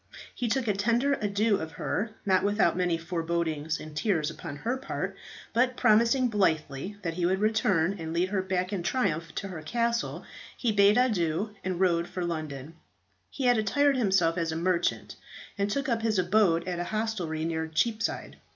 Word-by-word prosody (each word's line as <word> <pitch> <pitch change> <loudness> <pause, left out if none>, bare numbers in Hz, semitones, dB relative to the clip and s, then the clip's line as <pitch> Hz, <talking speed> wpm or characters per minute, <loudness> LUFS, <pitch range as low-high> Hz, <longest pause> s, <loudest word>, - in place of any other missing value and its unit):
He 245 - -2
took 245 +1 0
a 210 - +3
tender 235 +7 +2
adieu 205 +1 +2
of 160 0 -6
her, 215 +8 -3
not 190 -2 +3
without 205 -4 +2
many 175 -2 +1
forebodings 165 -2 -2
and 155 -1 -9
tears 160 -3 0
upon 145 - -7
her 230 - -2
part; 265 - -4 0.4
but 250 +1 +2
promising 235 +4 +4
blithely 185 - 0
that 165 -2 -2
he 175 +1 -1
would 190 +1 +2
return 200 -4 +2
and 160 -1 -5
lead 175 +3 +1
her 195 -1 0
back 185 +1 -2
in 190 - -1
triumph 170 -6 -1
to 195 - -4
her 170 -4 -6
castle, 235 +7 -1 0.3
he 235 - +1
bade 205 +1 +5
adieu 205 -5 +1
and 185 -2 -2
rode 170 -2 +2
for 180 -1 -4
London. 155 -3 -5 0.6
He 275 - -5
had 245 -2 +4
attired 280 +7 +2
himself 190 -7 +2
as 165 -1 -1
a - - -3
merchant, 175 +1 -1 0.4
and 200 0 -1
took 275 +6 -1
up 230 -3 0
his 220 -2 +1
abode 180 -2 +3
at 175 -1 -2
a 175 - -2
hostelry 185 -7 -2
near 160 -1 -2
Cheapside. 220 +8 -1
190 Hz, 180 wpm, -28 LUFS, 165-220 Hz, 0.6 s, bade